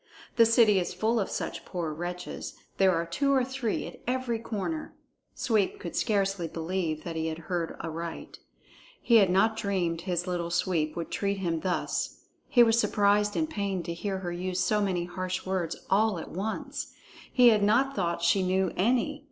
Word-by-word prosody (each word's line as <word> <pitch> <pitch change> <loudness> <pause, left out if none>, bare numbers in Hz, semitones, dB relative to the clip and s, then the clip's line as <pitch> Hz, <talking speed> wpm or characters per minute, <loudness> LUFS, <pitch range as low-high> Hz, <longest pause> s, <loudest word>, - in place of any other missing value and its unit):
The 230 -2 +6
city 225 -3 +5
is 175 - -3
full 225 +2 +1
of 195 - -1
such - - -4
poor 170 -4 -4
wretches; 175 +3 -5 0.2
there 190 -1 +5
are 165 +1 0
two 275 +12 0
or 265 -2 +3
three 255 -4 -2
at - - -9
every 250 -2 -1
corner." 230 +8 -4 0.4
Sweep 215 -5 +1
could 170 - -6
scarcely 195 -5 0
believe 165 -1 -3
that 170 -2 -5
he 160 0 -1
had 160 -1 -3
heard 170 -2 -1
aright. 165 +1 -6 0.6
He 235 - +5
had 195 -4 +5
not 220 +5 +3
dreamed 185 -6 -1
his 175 -1 -2
Little 175 -2 -2
Sweep 170 -3 0
would 170 -1 -5
treat 200 0 -1
him 170 -4 -1
thus. 180 +1 -2 0.3
He 240 - +7
was 225 0 +4
surprised 205 -1 +2
and 315 - +1
pained 200 - -3
to 170 - -3
hear 190 +3 -3
her 180 -2 -4
use 180 +1 -3
so 210 +2 +2
many 185 -4 0
harsh 185 +1 -4
words 185 -3 -1
all 210 0 +3
at 165 - -7
once. 205 +5 -4 0.4
He 250 -2 +7
had 215 -2 +4
not 245 +7 +3
thought 170 -3 -1
she 180 +3 +4
knew 185 0 +1
any. 255 +8 +1
190 Hz, 185 wpm, -28 LUFS, 175-220 Hz, 0.6 s, He